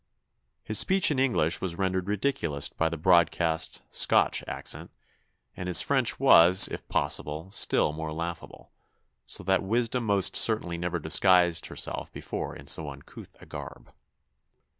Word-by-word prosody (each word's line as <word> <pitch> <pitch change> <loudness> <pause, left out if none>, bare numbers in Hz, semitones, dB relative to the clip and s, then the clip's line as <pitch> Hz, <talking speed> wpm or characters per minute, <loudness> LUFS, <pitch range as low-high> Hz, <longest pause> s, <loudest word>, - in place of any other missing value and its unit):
His 110 - +1
speech 190 -3 +4
in 140 - -1
English 120 -12 0
was 85 -3 -4
rendered 95 -1 -2
ridiculous 100 - -2
by 80 - -1
the 85 - -5
broadest 80 -1 +1
Scotch - - +2
accent, - - -5 0.7
and 90 - -7
his 90 - +4
French 130 -4 0
was, 90 -9 +6
if - - -9
possible, 75 +5 -3
still 85 -6 +1
more 80 0 -6
laughable, 85 +1 -7 0.6
so - - -4
that 95 +1 +1
wisdom 115 +4 -1
most 100 -2 +1
certainly 90 -7 +2
never 90 0 -3
disguised 85 +2 +2
herself - - -4
before - - -6
in 70 - -12
so 75 +2 0
uncouth 70 0 -13
a - - -14
garb. - - -11
90 Hz, 140 wpm, -27 LUFS, 80-105 Hz, 0.7 s, was